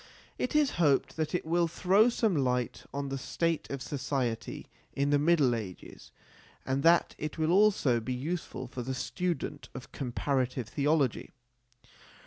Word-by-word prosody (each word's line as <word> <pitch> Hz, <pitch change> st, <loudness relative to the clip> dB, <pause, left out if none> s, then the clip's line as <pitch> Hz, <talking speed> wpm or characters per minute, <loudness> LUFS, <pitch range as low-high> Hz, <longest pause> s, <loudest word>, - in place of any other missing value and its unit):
It 250 Hz, -, -2 dB
is 300 Hz, -3 st, +4 dB
hoped 145 Hz, -4 st, +2 dB
that 160 Hz, +2 st, -1 dB
it 180 Hz, -, -2 dB
will 170 Hz, +1 st, +2 dB
throw 195 Hz, +7 st, +4 dB
some 225 Hz, -5 st, +1 dB
light 125 Hz, -4 st, -1 dB
on 140 Hz, 0 st, -3 dB
the 135 Hz, 0 st, -3 dB
state 165 Hz, +3 st, -1 dB
of 140 Hz, -2 st, -4 dB
society 130 Hz, -5 st, -3 dB, 0.3 s
in 140 Hz, +1 st, 0 dB
the 145 Hz, -, +4 dB
Middle 150 Hz, -5 st, +3 dB
Ages 105 Hz, -6 st, -7 dB, 0.5 s
and 135 Hz, +1 st, 0 dB
that 170 Hz, +3 st, +4 dB
it 155 Hz, +1 st, -4 dB
will 160 Hz, +1 st, +1 dB
also 190 Hz, -, +4 dB
be 115 Hz, +3 st, -5 dB
useful 145 Hz, -1 st, -4 dB
for 125 Hz, 0 st, -6 dB
the 130 Hz, +2 st, -3 dB
student 180 Hz, +5 st, -3 dB
of 130 Hz, -, -9 dB
comparative 130 Hz, -2 st, -2 dB
theology. 145 Hz, -1 st, +1 dB
140 Hz, 150 wpm, -30 LUFS, 130-170 Hz, 0.5 s, is